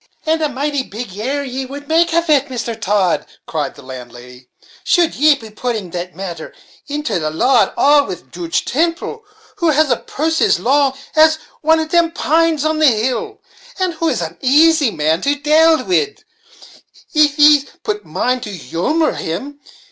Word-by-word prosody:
"And 320 0 +1
a 305 - +1
mighty 285 +1 -2
big 215 -4 -8
error 270 +7 -2
ye 265 0 -4
would 285 +2 -9
make 335 +2 +2
of 335 +1 +1
it, 290 -2 +2
Mister 235 -2 -4
Todd," 205 -4 0 0.2
cried 150 -4 -3
the 140 - -14
landlady, 125 -1 -11 0.3
"should 345 -3 +2
ye 300 +2 +4
be 225 -5 -12
putting 215 -4 -4
the 175 +1 -4
matter 175 -4 -7 0.3
into 295 - -2
the 155 -1 -2
law 240 +10 +3
at - - -12
all, 285 0 +4
with 180 -1 -8
Joodge 170 -1 -2
Temple, 335 - -2 0.4
who 340 - +1
has 305 -2 +2
a 240 - +2
purse 320 +2 -2
as - - +3
long 270 +5 +2 0.2
as 315 0 +6 0.3
one 320 +1 +3
of 315 0 -3
them 340 0 +3
pines 325 -2 +1
on 310 0 0
the 310 - +5
hill, 255 - -1 0.4
and 370 -2 -1
who 325 0 -1
is 235 - -1
an 165 +1 -7
asy 300 +1 +4
man 160 -2 0
to 285 +1 +1
dale 310 +2 +3
wid, 410 +3 -1 0.9
if 300 -1 +3
yees 295 -1 +6 0.2
but 420 -1 -3
mind 250 0 -1
the - - -7
humor 175 - 0
of - - -5
him. 270 - -5
280 Hz, 180 wpm, -17 LUFS, 205-315 Hz, 0.9 s, as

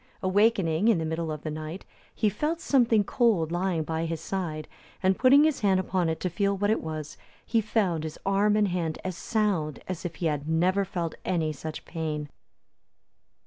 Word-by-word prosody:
Awaking 195 -2 +3
in 230 - +5
the 160 - -2
middle 160 0 -2
of 150 -1 -6
the 155 - -3
night, 155 +4 -6 0.3
he 215 - +1
felt 300 - -1
something 235 -8 +3
cold 200 -8 +2
lying 175 -2 0
by 160 +1 -2
his 165 -1 -3
side, 165 -3 -4 0.4
and 190 0 +4
putting 270 +5 +6
his 310 -3 +2
hand 195 -3 +3
upon 185 -2 0
it 160 - -2
to 180 - 0
feel 200 +3 0
what 205 +2 +1
it 220 - +1
was, 155 -2 -6 0.3
he 230 -1 +2
found 200 -7 0
his 155 -1 -5
arm 200 +2 +3
and 210 -2 +3
hand 170 -3 -2
as 185 -2 -3
sound 185 - -1
as 185 -3 -4
if 175 -3 -4
he 170 - -4
had 150 -1 -1
never 180 +5 +2
felt 175 -3 -3
any 160 -4 0
such 155 +2 -7
pain. 155 -3 -4
180 Hz, 190 wpm, -27 LUFS, 160-205 Hz, 0.4 s, putting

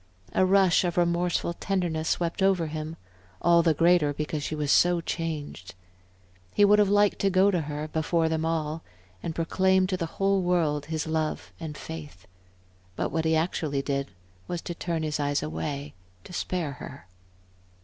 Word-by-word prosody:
A 185 - +3
rush 190 -2 +4
of 175 -1 -2
remorseful 170 0 +1
tenderness 175 -4 -1
swept 170 +1 -1
over 190 -3 +3
him, 155 +1 -5 0.4
all 170 0 +5
the 165 -2 +2
greater 165 -2 +4
because 150 0 -3
she 155 - -3
was 150 -2 -1
so 175 0 +4
changed. 155 - -5 0.8
He 205 - +6
would 210 +1 +5
have 205 -2 +4
liked 205 0 +3
to 195 - +2
go 190 +2 +4
to 180 -3 +1
her 150 0 -4
before 160 +1 0
them 160 0 -1
all, 160 -1 -1 0.4
and 160 - -4
proclaim 190 +3 +2
to 185 0 -1
the 170 -2 -2
whole 195 0 +2
world 160 -5 +1
his 155 -1 -2
love 160 -1 -2
and 155 -3 -6
faith. 150 - -9 0.7
But - - -2
what 160 0 -1
he 160 0 +3
actually 155 -4 -1
did 140 -1 -2 0.4
was 175 - -3
to 175 - -4
turn 170 -1 -3
his 150 -1 -2
eyes 145 0 0
away, 80 - -4 0.3
to - - -12
spare 175 -4 -2
her. 140 - -10
165 Hz, 170 wpm, -27 LUFS, 150-180 Hz, 0.8 s, He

